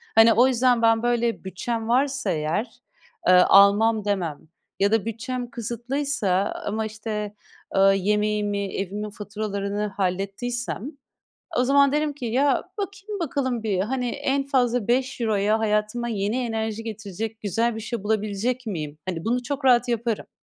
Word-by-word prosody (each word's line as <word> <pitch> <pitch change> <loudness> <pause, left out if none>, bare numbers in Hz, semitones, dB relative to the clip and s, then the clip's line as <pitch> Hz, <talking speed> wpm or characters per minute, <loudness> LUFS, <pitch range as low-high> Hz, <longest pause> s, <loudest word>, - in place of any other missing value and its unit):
Hani, 225 0 +7
o 245 +4 +5
yüzden 245 -2 +3
ben, 225 0 +3
böyle, 235 -2 0
bütçem 225 +4 -3
varsa 265 +1 +1
eğer, 160 +8 -1 0.6
eee, 185 - +7
almam 200 +4 +6
demem 175 -8 -1 0.4
ya 200 +1 +3
da 225 -1 +2
bütçem 240 +2 -4
kısıtlıysa 235 -4 -1
ama, 220 +1 -1
işte, 215 -1 -4 0.4
eee, 195 - +4 0.2
yemeğimi, 210 0 0
evimin 205 +2 -3
faturalarını 205 0 -3
hallettiysem, 200 +7 -3 0.7
o 250 - +3
zaman 280 +1 +4
derim 300 0 +1
ki, 275 -3 -9
ya, 265 +4 +2
bakayım 400 0 -5
bakalım 260 -6 -1
bir, 200 -4 0
hani, 250 +4 -1
en 275 +3 0
fazla 245 -5 +1
€5'ya 225 -4 +1
hayatıma 215 +2 0
yeni 210 +1 -1
enerji 225 -1 -3
getirecek 220 0 -5
güzel 225 +4 0
bir - - -5
şey 225 -1 -4
bulabilecek 220 +4 -1
miyim? 155 -7 -4
Hani, 165 -3 -3
bunu 245 +2 0
çok 280 +1 -4
rahat 245 -1 +5
yaparım. 235 -2 -1
225 Hz, 140 wpm, -24 LUFS, 205-245 Hz, 0.7 s, Hani